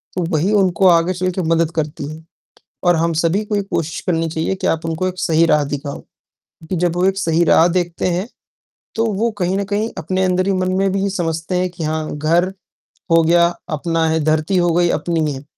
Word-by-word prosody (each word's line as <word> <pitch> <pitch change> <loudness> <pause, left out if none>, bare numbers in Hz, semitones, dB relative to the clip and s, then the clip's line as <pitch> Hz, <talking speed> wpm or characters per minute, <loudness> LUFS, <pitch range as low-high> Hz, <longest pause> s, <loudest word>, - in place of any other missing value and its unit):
तो 180 - -1
वही 180 +7 +1
उनको 190 -2 +3
आगे 170 +1 +4
चलकर 185 +1 -2
मदद 165 0 +2
करती 150 -2 -3
है 160 +1 -10 0.6
और 175 -1 +4
हम 165 +1 +1
सभी 190 +6 +1
को 210 0 -2
एक 200 -1 -2
कोशिश 160 0 -2
करनी 165 -2 0
चाहिए 160 +4 -1
कि 190 0 -4
आप 165 0 0
उनको 165 +3 -1
एक 185 0 -7
सही 165 0 +2
राह 150 -2 +3
दिखाओ 140 0 -5 0.5
क्योंकि 165 +3 -7
जब 175 0 0
वो 180 - +1
एक 195 0 +1
सही 170 -2 +2
राह 165 +1 +5
देखते 175 -1 -1
हैं, 180 +4 -1 0.7
तो 225 - 0
वो 225 +4 0
कहीं 185 +1 0
न 200 - -1
कहीं 210 +3 -2
अपने 185 +4 -1
अंदर 185 +1 +1
ही 200 - +2
मन 185 0 0
में 195 0 +2
भी 195 0 0
समझते 165 -1 -3
हैं 180 -1 -1
कि 170 -2 -6
हाँ, 155 0 -2
घर 170 +5 +1 0.6
हो 165 0 +5
गया 170 +1 +4 0.3
अपना 165 +1 0
है, 160 0 +1
धरती 155 +4 +1
हो 175 -1 +2
गई, 175 0 +3
अपनी 160 -4 0
है। 135 +1 -8
175 Hz, 215 wpm, -18 LUFS, 160-185 Hz, 0.7 s, राह